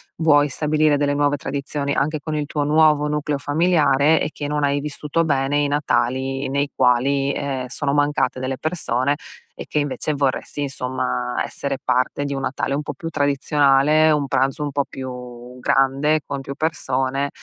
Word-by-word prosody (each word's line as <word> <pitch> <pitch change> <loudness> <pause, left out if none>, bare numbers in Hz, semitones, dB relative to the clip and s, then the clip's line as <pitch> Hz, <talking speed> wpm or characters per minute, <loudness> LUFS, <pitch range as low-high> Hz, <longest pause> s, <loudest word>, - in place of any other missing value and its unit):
vuoi 145 -3 +4
stabilire 150 +1 +2
delle 145 0 +1
nuove 145 0 +1
tradizioni, 140 +1 -3
anche 150 +2 0
con 155 +2 -5
il 145 -1 -2
tuo 150 -1 -1
nuovo 150 0 +4
nucleo 150 -1 -1
familiare, 150 0 +3
e 150 - -2
che 145 - -5
non 150 0 -1
hai 140 0 +2
vissuto 150 +2 -2
bene 140 -1 +1
i 145 - +1
Natali 135 -1 0
nei 140 +1 -1
quali, 135 +2 +2
ehm, 135 -3 -3
sono 140 +2 -2
mancate 145 -3 +1
delle 130 0 -3
persone, 145 -5 -1 0.4
e - - -9
che - - -2
invece 145 +1 -1
vorresti 140 +1 -1
insomma 125 -2 -3
essere 140 -1 -3
parte 130 +3 0
di 140 - -3
un 135 - -3
Natale 135 +1 -2
un 145 - 0
po' - - -5
più 165 - -6
tradizionale, 145 +1 +3
un 150 -2 +2
pranzo 135 +2 0
un 145 - -3
po' 140 0 0
più 125 -1 -8
grande, 140 +4 +2
con 140 -1 -4
più 135 0 -7
persone, 135 -3 -1
140 Hz, 170 wpm, -21 LUFS, 135-150 Hz, 0.4 s, vuoi